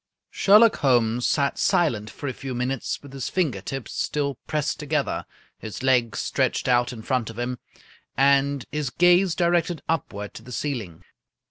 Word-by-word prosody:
Sherlock 210 +2 +5
Holmes 120 -3 +2
sat 140 -1 0
silent 115 -11 +1
for 145 - -7
a 130 - -2
few 130 0 -6
minutes 125 +2 -2
with 140 -1 -12
his 135 -2 -4
finger 150 - -1
tips 135 +5 -6
still 140 -3 -2
pressed 150 -1 -1
together, 150 -1 -2 0.3
his 110 +2 -7
legs 125 -3 +2
stretched 130 -1 0
out 125 0 +3
in 115 -3 -9
front 125 -3 -1
of 115 - -10
him, 120 0 -3 0.6
and 140 -1 +3
his 150 -3 -2
gaze 175 +4 +4
directed 175 -1 +1
upward 105 -10 -3
to - - -10
the 120 +3 -12
ceiling. 115 - -4
135 Hz, 160 wpm, -24 LUFS, 120-150 Hz, 0.6 s, Sherlock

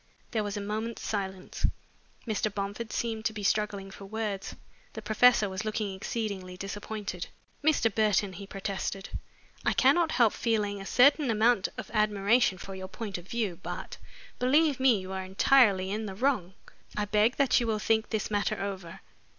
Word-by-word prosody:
There 220 -2 0
was 205 0 -3
a - - -3
moment's 215 +3 -4
silence. 190 -3 -2 0.6
Mr. 215 -2 -1
Bomford 205 +3 -4
seemed 225 -2 -2
to 220 - +1
be 210 -1 -6
struggling 200 -1 0
for 195 - -10
words. 210 -1 -4 0.4
The 220 - -6
professor 215 +1 +5
was 190 +2 -4
looking 215 -2 -2
exceedingly 190 -2 -4
disappointed. 200 -1 -5 0.4
"Mr. 285 -8 +3
Burton," 210 -2 +2
he 200 +1 -8
protested, 195 0 -4 0.5
"I - - +2
cannot 340 -2 +4
help 235 -3 +4
feeling 210 -3 0
a 195 - -7
certain 280 +2 +5
amount 220 -2 +3
of - - -7
admiration 210 0 +3
for 195 +2 -8
your 190 0 -6
point 200 -2 -5
of 175 - -15
view, 210 -7 -2
but, - - -6 0.4
believe 285 +3 +3
me, 255 -5 +4
you 185 0 -7
are 190 0 -3
entirely 195 0 +4
in 215 +1 -2
the 190 - -6
wrong. 205 -6 0 0.4
I 210 - +1
beg 210 +4 +3
that 275 -2 +3
you 240 - -1
will 220 -1 +1
think 220 +1 +1
this 220 -1 -2
matter 205 -1 0
over." 195 -2 -5
210 Hz, 170 wpm, -29 LUFS, 195-225 Hz, 0.6 s, professor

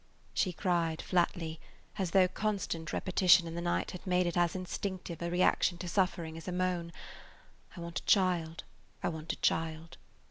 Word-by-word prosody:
She 185 - +1
cried 170 -3 0
flatly, 170 -3 0 0.4
as 190 -3 0
though 185 +1 +5
constant 185 -5 -2
repetition 180 -2 +4
in 165 - -6
the 170 - -3
night 175 0 -1
had 180 - -9
made 180 0 +3
it 175 - -1
as 175 0 +2
instinctive 185 -2 -4
a 170 - -1
reaction 175 0 +2
to 180 - -6
suffering 170 -3 0
as 165 - -10
a - - -2
moan, 180 -2 -1 0.9
"I - - -6
want 170 0 -4
a - - -20
child! 175 -4 +2 0.4
I - - +2
want 160 -1 -4
a - - -4
child!" 160 0 -1
175 Hz, 175 wpm, -32 LUFS, 165-185 Hz, 0.9 s, though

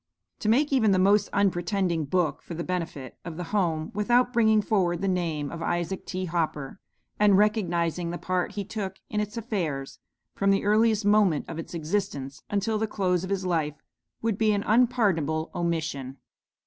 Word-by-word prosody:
To 215 - -1
make 280 +6 +3
even 230 -5 +4
the - - +3
most 200 +2 +4
unpretending 180 -3 +1
book 175 +2 0
for 170 - -8
the 170 - -3
benefit 165 -8 -4
of 165 -2 -7
'The 180 - -3
Home,' 165 -6 0
without 240 +4 +2
bringing 220 -2 +4
forward 190 -5 +1
the 195 - 0
name 165 -6 -1
of 170 - -6
Isaac 175 +3 -2
T. 185 0 -3
Hopper, 160 -2 -2 0.4
and 205 -2 +5
recognizing 175 -5 +1
the 175 - -3
part 180 0 -1
he 200 -1 -4
took 195 -3 -4 0.2
in 210 - 0
its 210 +2 -3
affairs, 170 - -3 0.3
from 200 - +1
the 195 0 +2
earliest 215 0 +3
moment 205 -7 +3
of 165 -1 -6
its 165 - -7
existence 155 -5 -3
until 210 +2 0
the 220 - 0
close 185 -4 0
of 185 - -5
his 195 -1 -1
life, 160 -4 0 0.5
would 225 -3 0
be 215 -1 +3
an 200 0 0
unpardonable 200 - +2
omission. 160 -6 -2
185 Hz, 175 wpm, -26 LUFS, 165-210 Hz, 0.5 s, and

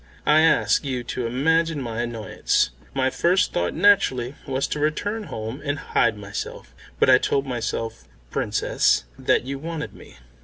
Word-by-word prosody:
I 150 +1 +5
ask 160 0 +3
you 130 -3 -3
to 120 0 -3
imagine 160 +5 +1
my 120 -3 -3
annoyance. 115 - 0 0.2
My 130 -1 +1
first 180 +7 +2
thought 85 0 -1
naturally 160 -10 +3
was 135 0 0
to 150 - -2
return 205 +9 -1
home 115 -3 -6
and 145 -1 -1
hide 115 -6 +1
myself; 100 -1 -7 0.3
but - - +4
I 130 -1 +7
told 140 +1 0
myself, 115 -2 -4 0.3
Princess, - - +1 0.2
that - - +2
you 135 +2 -5
wanted 160 0 -5
me." - - -15
130 Hz, 155 wpm, -23 LUFS, 115-155 Hz, 0.3 s, I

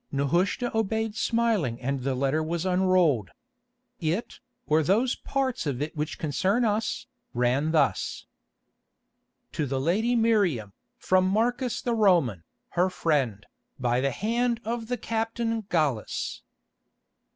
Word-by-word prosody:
Nehushta 175 - 0
obeyed 220 0 0
smiling 220 - +1
and 135 +2 -2
the 135 +1 -1
letter 135 +4 +1
was 165 +2 -2
unrolled. 180 - +3 0.7
It, 170 +8 -2 0.3
or 155 +1 +3
those 220 - +2
parts 265 - -2
of 135 -4 -2
it 150 +2 -3
which 150 0 -3
concern 185 - +1
us, 215 +4 -1 0.3
ran 125 +5 +2
thus: 160 -1 +1 1.3
"To 150 - -2
the 135 0 -1
lady 215 - +1
Miriam, 200 - +2 0.2
from 185 0 +2
Marcus 240 +5 0
the 240 - 0
Roman, 175 - +3 0.3
her 180 +2 +2
friend, 140 - 0 0.3
by 125 0 +1
the 140 - +2
hand 230 - 0
of 230 0 -3
the 245 +1 -1
Captain 225 -1 -2
Gallus. 145 -10 -1
180 Hz, 125 wpm, -27 LUFS, 140-225 Hz, 1.3 s, unrolled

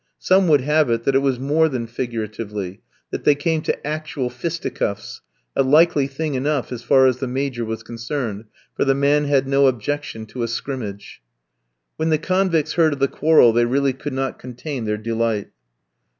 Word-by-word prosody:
Some 190 0 +3
would 150 -4 +5
have 150 0 +2
it 115 0 0
that 135 - +1
it 135 - +4
was 135 -2 0
more 155 +4 +2
than 125 -4 -3
figuratively, 105 -5 -5 0.3
that - - -4
they 145 - +5
came 160 +2 0
to - - -3
actual 150 -4 -3
fisticuffs, 125 -7 -4 0.3
a - - +3
likely 145 +1 +4
thing 145 +2 -3
enough 140 0 -1
as 120 -2 -5
far 130 +2 +4
as 130 -2 +3
the 130 0 -3
Major 130 -1 -2
was 110 0 -5
concerned, 115 -2 -4 0.3
for - - +1
the 135 -1 +2
man 145 +2 +2
had 140 -2 +2
no 140 0 +4
objection 130 -1 -2
to 120 +3 -7
a 115 - 0
scrimmage. 115 - -6 0.8
When 160 +1 0
the 155 - +3
convicts 170 -2 +1
heard 160 -3 +3
of 140 - -6
the 135 - +3
quarrel 150 -6 +4
they 120 +1 +3
really 135 +2 +1
could 140 +3 -6
not 135 -1 -3
contain 125 0 -6
their 105 0 -1
delight. 115 -1 -2
135 Hz, 185 wpm, -21 LUFS, 115-150 Hz, 0.8 s, would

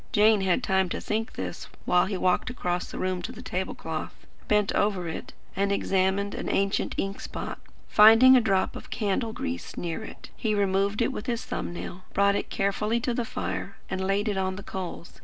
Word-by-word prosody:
Jane 215 -2 +5
had 190 +6 +1
time 190 -4 +2
to - - -3
think 220 +1 -2
this, - - -5 0.2
while 180 0 +4
he 195 -1 -2
walked 180 +5 +1
across 180 -8 -2
to - - -7
the 185 -1 -3
table 185 +1 -3
cloth, 160 -1 -6 0.2
bent 210 -1 +2
over 195 -4 +1
it, 160 - -6 0.2
and 200 +1 +1
examined 195 +1 +1
an - - -4
ancient 195 0 0 0.3
spot - - -6
of - - -4 0.2
ink. - - -28
Finding 225 +5 +8
a 250 - +6
drop 195 -4 +1
of - - -9
candle 220 +1 -1
grease 260 +2 -5
near 170 +5 -3
it, - - -11
he 215 -2 0
removed 200 +2 +1
it 250 - 0
with 210 - -6
his 235 -2 -2
thumb - - -3
nail; 175 +1 -7
brought 200 0 +4
it - - -2
carefully 210 +3 0
to 240 +1 -1
the 240 - 0
fire, 95 - -4 0.2
and 190 0 -1
laid 195 +3 +1
it 205 -2 0
on 190 0 0
the 200 - -8
coals. 180 -3 -7
200 Hz, 200 wpm, -27 LUFS, 185-220 Hz, 0.3 s, Finding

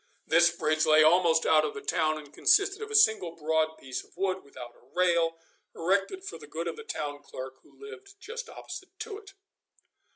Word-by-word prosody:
This 170 +1 +5
bridge 155 -2 0
lay 155 0 +6
almost 165 0 +4
out 155 -1 +5
of 150 - -3
the 140 - -6
town, 155 -1 0
and 150 -1 -12
consisted 400 - +3
of 435 - -6
a 435 - -3
single 215 - +4
broad 160 0 0
piece 130 -1 -6
of - - -25
wood 190 0 -1
without 125 -3 -11
a - - -23
rail, 170 -2 +2 0.4
erected 195 - 0
for 400 - -8
the - - -12
good - - -5
of - - -3
the 455 - -9
town 145 - -5
clerk, 130 -1 -9
who - - -24
lived, 415 -2 -11
just 465 +6 -7
opposite 380 0 -10
to 440 -1 -6
it. 400 -2 -16
170 Hz, 200 wpm, -28 LUFS, -, 0.4 s, lay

